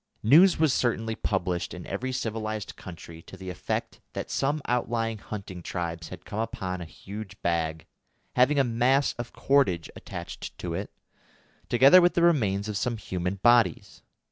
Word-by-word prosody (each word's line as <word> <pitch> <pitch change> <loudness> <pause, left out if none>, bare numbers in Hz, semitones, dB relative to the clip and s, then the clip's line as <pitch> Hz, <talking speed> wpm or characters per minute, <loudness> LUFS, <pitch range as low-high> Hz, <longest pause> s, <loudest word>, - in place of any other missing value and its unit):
News 165 - +7
was 155 -5 +4
certainly 115 -3 0
published 90 -5 -2
in 90 - -8
every 130 +1 -3
civilised 110 -4 -3
country 85 -2 -10
to 95 - -12
the 95 -1 -6
effect - - -3
that - - -5
some 145 +3 0
outlying 115 -2 -1
hunting 95 -4 -7
tribes 85 -1 -4
had 90 -1 -10
come 105 - -5
upon 95 -5 -3
a - - -5
huge 100 +4 -9
bag, 80 -3 -1 0.5
having 130 +4 +4
a 140 - +5
mass 125 +3 +2
of 120 0 -5
cordage 130 -12 +2
attached - - -8
to - - -4
it, - - -4 0.8
together 135 +9 +7
with 175 0 +3
the 170 - +3
remains 110 - +2
of 105 -2 -2
some 120 +2 -1
human 90 -2 -3
bodies. 120 -8 +3
110 Hz, 160 wpm, -27 LUFS, 90-125 Hz, 0.8 s, News